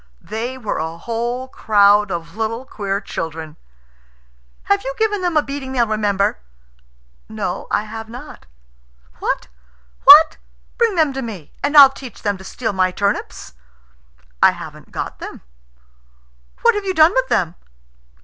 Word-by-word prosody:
"They 235 +4 -4
were 220 -5 -3
a 160 +1 -4
whole 235 +6 -3
crowd 205 -4 +3
of 170 -1 -5
little 225 +3 -3
queer 200 -5 -3
children." 160 -5 -6 1.1
"Have 200 +6 +1
you 270 +1 -4
given 420 -3 0
them 350 -3 0
a 300 - +3
beating 275 -1 -6
they'll 240 -2 +2
remember?" 205 - 0 0.9
"No, - - -4
I - - +1
have 220 +1 -8
not." 240 - -11 0.7
"What? - - -2 1.3
Bring 455 -4 +2
them 310 -5 +2
to 270 - -4
me, 205 - -8
and 290 +1 +2
I'll 275 -2 +10
teach 260 -4 -11
them 205 -1 0
to - - -11
steal 220 +2 -4
my 185 -1 +2
turnips!" 190 - -3 0.9
"I - - +6
haven't - - -11
got - - -5
them." - - -8 1.2
"What 470 - +6
have 415 -1 -3
you 380 -1 -2
done 320 +3 +6
with - - +1
them?" 170 - 0
225 Hz, 145 wpm, -19 LUFS, 200-275 Hz, 1.3 s, I'll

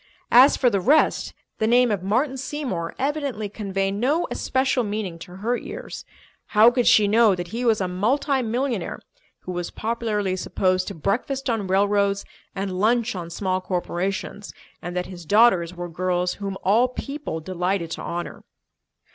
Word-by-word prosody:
As 255 +4 +7
for 250 -3 +3
the 200 -2 +1
rest, 295 - +3 0.3
the 220 - +1
name 245 0 +4
of 200 -3 -1
Martin 245 +9 0
Seymour 265 - -4
evidently 275 -6 -2
conveyed 195 -2 -2
no 270 +11 +1
especial 260 -1 0
meaning 205 -5 -4
to 180 +2 -10
her 225 +6 -1
ears. - - -7 0.5
How 225 +3 +8
could 245 -1 +1
she 210 -1 +6
know 215 -1 +4
that 175 -1 -6
he 235 +6 -4
was 225 -2 +3
a 185 - 0
multi 260 +9 +1
millionaire 240 -3 -2 0.4
who 185 - -6
was 175 -1 -3
popularly 215 -4 -2
supposed 185 0 0
to - - -5
breakfast 255 - -1
on 215 -4 -2
railroads 200 +1 +2 0.3
and 190 -1 -3
lunch 235 +2 +2
on 170 -2 -5
small 185 +1 -2
corporations, 185 +3 -3 0.3
and 175 +1 -5
that 180 - -1
his 180 -2 -9
daughters 185 -2 +4
were 175 0 -5
girls 180 +1 -1
whom 195 -1 -5
all 225 +6 +4
people 275 - -5
delighted 180 0 -2
to - - -5
honour? 175 0 -5
205 Hz, 165 wpm, -23 LUFS, 185-240 Hz, 0.5 s, How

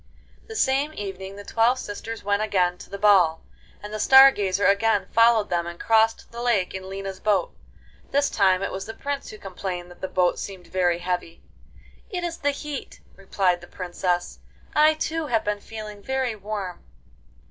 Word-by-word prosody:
The 445 - -8
same 285 -2 +1
evening 195 -1 -6
the 205 - -9
twelve 230 +4 +2
sisters 225 0 -6
went 200 +1 +1
again 180 -4 +1
to - - -12
the 200 - -6
ball, 190 -6 +4 0.4
and 210 0 -7
the 215 - -3
Star 270 +4 +8
Gazer 200 -3 -1
again 200 +3 +3
followed 230 -3 +4
them 170 -1 0
and 175 0 -8
crossed 225 0 +2
the 235 0 -7
lake 230 -7 +1
in 190 0 -7
Lina's 195 -1 -6
boat. 200 -4 0 0.5
This 285 +1 +2
time 190 -2 +3
it - - -2
was 195 +1 -5
the 225 - -7
Prince 285 0 -4
who 215 - -9
complained 180 -2 -6
that 175 - -16
the 190 - -2
boat 180 -1 +1
seemed 190 -3 -7
very 175 0 +1
heavy. 175 -1 -4 0.7
'It 360 -3 -4
is 340 -1 -3
the 285 - +1
heat,' 285 -1 -6 0.2
replied 190 -2 0
the 175 - -12
Princess. 175 -1 -3 0.4
'I, 305 +1 +5
too, 320 0 -2
have 225 -4 +1
been 205 0 -1
feeling 215 -2 -8
very 260 -1 -1
warm. 200 -3 -6
205 Hz, 180 wpm, -24 LUFS, 185-235 Hz, 0.7 s, Star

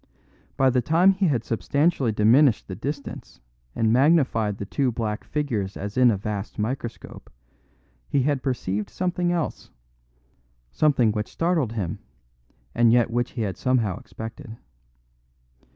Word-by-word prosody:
By 135 -1 +4
the 125 0 +2
time 165 +8 +4
he 195 0 +1
had 125 -7 0
substantially 140 +3 0
diminished 115 +4 +4
the 95 - -6
distance 140 - -6 0.4
and 110 0 +2
magnified 130 -7 +3
the 100 - -5
two 130 +5 0
black 110 -2 -3
figures 115 -11 -3
as 100 +1 -6
in 125 -1 +5
a 105 - +1
vast 105 +1 -5
microscope, 120 +3 -5 0.8
he 135 - +2
had 140 -1 0
perceived 105 -6 -2
something 180 -1 -1
else; 170 -3 -3 1.0
something 130 - +3
which 105 0 -3
startled 165 -9 0
him, 95 -7 -3 0.7
and 115 -1 +4
yet 120 -1 +3
which 120 +1 -1
he 115 - -2
had 95 -3 -3
somehow 120 -7 0
expected. 115 0 -9
120 Hz, 135 wpm, -24 LUFS, 110-145 Hz, 1.0 s, in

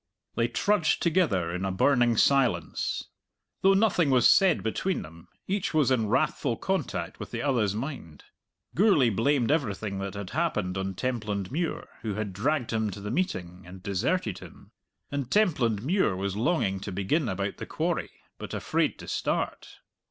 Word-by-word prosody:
They 115 - +1
trudged 190 - +1
together 155 - +2
in 90 +1 -3
a 95 - 0
burning 120 +3 +3
silence. 120 - +2 0.6
Though 195 0 +5
nothing 195 -7 +3
was 125 -3 +5
said 190 -5 +4
between 185 - -1
them, 85 +3 -13 0.2
each 190 -4 -1
was 145 -4 +3
in 115 -4 +2
wrathful 120 +1 +1
contact 95 - -2
with - - -6
the 115 0 -4
other's 115 -8 +1
mind. 115 - -6 0.5
Gourlay 170 - +4
blamed 120 +4 +2
everything 105 -9 -1
that 95 0 -4
had 100 -2 -6
happened 110 - -1
on 95 0 -3
Templandmuir, 120 - -2
who 105 -3 -3
had 105 -2 -3
dragged 125 +3 0
him 110 -1 0
to 100 +1 -7
the 105 +1 -5
meeting 90 - -2
and 90 +1 -11
deserted 100 - -1
him. - - -14 0.4
And 140 -3 -3
Templandmuir 135 - +2
was 95 +1 -2
longing 105 - +1
to 100 - -6
begin 110 - 0
about 100 +1 -3
the - - -7
quarry, - - -1 0.3
but - - -6
afraid - - 0
to - - -11
start. - - -3
115 Hz, 160 wpm, -27 LUFS, 95-150 Hz, 0.6 s, Though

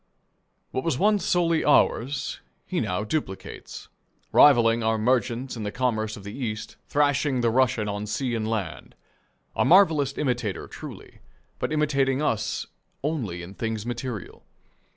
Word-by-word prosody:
What 130 - -2
was 160 -6 0
once 205 +1 +3
solely 170 -2 +2
ours 140 -2 +2 0.3
he - - -2
now 100 -1 -1
duplicates, 110 -5 -5 0.4
rivalling 120 -5 +6
our 110 0 +1
merchants 125 +2 0
in 115 - -6
the 105 -1 -3
commerce 110 -4 -1
of 100 - -11
the 100 +1 -7
East, 110 -5 -4
thrashing 145 -2 +2
the 115 -1 +2
Russian 120 -3 +2
on 105 +1 -3
sea 125 +3 -2
and 110 -2 -1
land. 95 - -4 0.6
A - - +2
marvellous 160 -7 +4
imitator 120 -8 -1
truly, - - -10 0.4
but - - -2
imitating 140 -3 +1
us 115 -8 -1 0.4
only 115 - -2
in 90 +3 -9
things 110 0 -3
material. 120 -4 -5
120 Hz, 140 wpm, -25 LUFS, 110-140 Hz, 0.6 s, rivalling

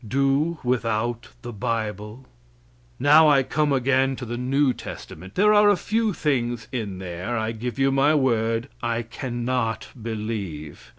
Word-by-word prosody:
Do 140 +7 +1
without 120 -1 -1
the 120 0 -6
bible? 110 +1 -4 0.7
Now 150 +3 +6
I 140 -2 +5
come 150 +2 0
again 135 0 +2
to 125 - -7
the 120 +1 -4
new 130 +2 +1
testament. 95 -3 -9
There 210 +2 +5
are 210 0 +6
a 205 - +4
few 220 +3 0
things 120 - -1
in 110 -7 -4
there, 95 +5 -4
I 110 0 -1
give 120 +3 -5
you 135 0 +3
my 140 +3 +3
word, 115 -4 +1
I 120 0 -1
cannot 120 -1 -3
believe. 105 -9 -5
120 Hz, 150 wpm, -24 LUFS, 110-135 Hz, 0.7 s, Now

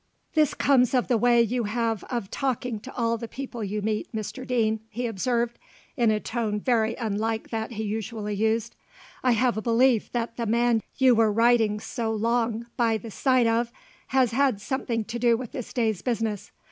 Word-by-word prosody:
"This 310 -3 +3
comes 260 -2 +3
of 250 - +1
the 240 - +4
way 240 0 +5
you 235 +1 -1
have 225 0 -1
of 235 -6 -4
talking 250 -4 -2
to 260 +5 -11
all 230 -1 +1
the 230 - -5
people 250 -2 -6
you 205 +1 -3
meet, 215 0 -2
Mr 225 +4 -5
Deane," 220 -3 +1
he 240 +3 -4
observed, 235 +2 -1 0.4
in 240 -5 +3
a 215 -1 +2
tone 220 -2 -2
very 225 -1 +1
unlike 220 -1 -2
that 225 +1 -3
he 220 0 -3
usually 215 0 -3
used. 220 +2 0 0.5
"I 250 -1 +4
have 240 0 +2
a - - -1
belief 235 0 +3
that 230 -1 -2
the 235 -2 -2
man 235 0 +2 0.2
you 260 -2 +5
were 225 -2 +4
riding 225 -1 +3
so 225 +1 -3
long 230 +1 0
by 230 -2 +2
the 220 +1 -9
side 255 +1 +2
of 230 +1 +1 0.4
has 260 -3 +2
had 260 -3 +2
something 235 0 -2
to 235 +2 -5
do 235 -1 +4
with 245 -1 -7
this 250 - -6
day's 220 -6 0
business. 225 -4 -2
230 Hz, 190 wpm, -26 LUFS, 220-245 Hz, 0.5 s, way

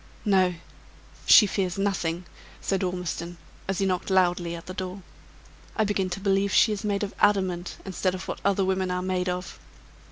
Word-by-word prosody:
"No; 185 -3 +3 0.7
she 215 - +9
fears 190 -2 -1
nothing," 180 -3 -1 0.3
said 195 -1 -1
Ormiston, 180 -2 -3 0.3
as 195 -1 -1
he 195 - +1
knocked 185 0 -1
loudly 175 -2 +2
at 170 - -9
the 185 - -7
door. 185 +1 -5 0.7
"I 220 - +2
begin 200 -3 0
to 180 +2 -4
believe 195 0 +1
she 220 - +5
is 210 0 -3
made 205 -1 0
of 200 - -4
adamant 190 -4 +1
instead 185 -1 -1
of 185 - -7
what - - -5
other 195 -1 +2
women 190 0 0
are 180 0 -1
made 185 -1 -1
of." 180 0 -5
185 Hz, 180 wpm, -26 LUFS, 180-195 Hz, 0.7 s, she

